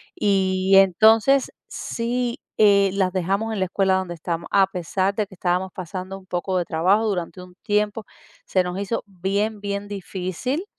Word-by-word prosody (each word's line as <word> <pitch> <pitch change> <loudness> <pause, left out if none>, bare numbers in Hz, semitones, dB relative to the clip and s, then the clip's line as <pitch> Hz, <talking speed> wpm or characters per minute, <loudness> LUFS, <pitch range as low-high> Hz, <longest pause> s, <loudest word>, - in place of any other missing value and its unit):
y 190 -1 +1
entonces 220 +7 +5 0.2
Sí, 240 +1 -3 0.2
eh, 200 -2 +5
las 190 -2 0
dejamos 195 +5 -1
en 205 - -3
la 185 - +1
escuela 190 +1 +1
donde 185 -2 -3
estamos 170 0 -4
a 195 -1 +5
pesar 190 +1 -1
de 210 -3 -1
que 190 - -15
estábamos 180 +1 -1
pasando 185 +1 -6
un 185 - -20
poco 185 +1 -2
de 175 - 0
trabajo 185 +7 +2
durante 180 -2 -3
un 180 0 -15
tiempo, 210 +1 0 0.4
se 185 -1 +1
nos 180 +2 -4
hizo 200 +3 -2
bien, 200 +3 -2
bien 200 0 -4
difícil 200 - -4
195 Hz, 165 wpm, -23 LUFS, 185-210 Hz, 0.4 s, entonces